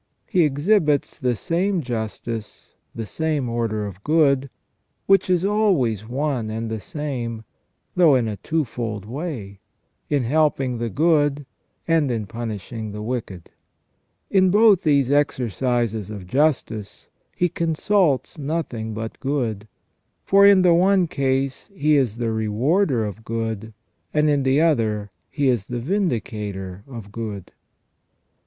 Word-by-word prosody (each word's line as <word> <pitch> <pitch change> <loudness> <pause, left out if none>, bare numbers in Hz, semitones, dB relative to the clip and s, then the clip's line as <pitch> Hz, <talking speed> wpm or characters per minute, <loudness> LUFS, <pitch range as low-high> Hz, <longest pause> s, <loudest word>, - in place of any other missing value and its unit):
He 180 - +2
exhibits 150 0 +1
the 125 -2 +1
same 180 - 0
justice, 115 -2 -5 0.2
the 115 - -4
same 155 +1 -1
order 115 -3 -1
of 100 -1 -9
good, 140 -4 +3 0.6
which 195 -1 +4
is 180 0 +2
always 175 - +1
one 130 -3 -1
and 110 +1 -4
the 110 - -3
same, 120 -2 -4 0.5
though 165 -6 +6
in 120 -3 +1
a 105 -2 -4
twofold 115 - -3
way, 120 - -6 0.5
in 145 -3 +1
helping 135 -2 +1
the 120 0 -2
good 145 - +2 0.4
and 165 -4 +2
in 115 -3 -2
punishing 110 0 -6
the 105 0 -6
wicked. 110 -7 -5 0.8
In 190 -1 +4
both 205 -1 +5
these 140 -4 +2
exercises 120 -6 0
of 100 -4 -7
justice 115 - -1 0.3
He 180 - +2
consults 165 -3 0
nothing 135 -8 -3
but 110 0 -6
good, 120 -7 -2 0.6
for 200 0 +6
in 195 -2 +6
the 175 -2 +6
one 185 +2 +4
case 135 -3 -1
He 150 -3 +3
is 125 -6 +1
the 115 -1 -1
rewarder 115 - +1
of 105 +2 -7
good, 110 -1 -3 0.4
and 150 0 +4
in 145 -1 +2
the 135 +3 +3
other 110 - +1 0.2
He 145 -2 0
is 120 -6 +1
the 120 - -4
vindicator 105 - -3
of 115 -6 -9
good. 105 -4 -6
130 Hz, 135 wpm, -22 LUFS, 110-155 Hz, 0.8 s, though